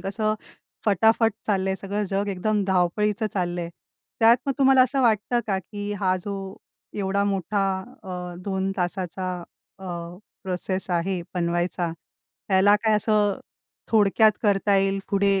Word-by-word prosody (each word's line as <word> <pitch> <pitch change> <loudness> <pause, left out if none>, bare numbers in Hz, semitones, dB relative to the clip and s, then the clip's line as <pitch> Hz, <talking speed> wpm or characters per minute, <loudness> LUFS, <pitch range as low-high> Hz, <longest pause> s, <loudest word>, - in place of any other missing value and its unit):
कसं 215 +3 -1 0.5
फटाफट 220 +3 +4 0.2
चाललंय, 190 -2 +1
सगळं 200 +2 -3
जग 200 +1 0
एकदम 200 +2 0
धावपळीचं 200 +4 +1
चाललंय. 175 -2 -2 0.5
त्यात 230 +2 +7
मग 275 - +1
तुम्हाला 265 -1 +6
असं 265 +1 +1
वाटतं 235 +1 +2
का, 195 -2 0
की 205 +2 -6
हा 185 -2 +2
जो 195 -1 -5 0.4
एवढा 200 +1 0
मोठा 200 +1 0 0.4
अ, 180 -2 -6
2 190 -1 -1
तासाचा 185 0 -2 0.5
अ, 190 - -11 0.6
प्रोसेस 185 0 -3
आहे 175 +1 0
बनवायचा, 175 0 -1 0.6
याला 205 +2 +6
काय 220 -1 +4
असं 210 -1 +1 0.5
थोडक्यात 215 0 +5
करता 200 -1 +3
येईल 195 0 +1
पुढे, 200 -1 +2
195 Hz, 130 wpm, -24 LUFS, 185-210 Hz, 0.6 s, त्यात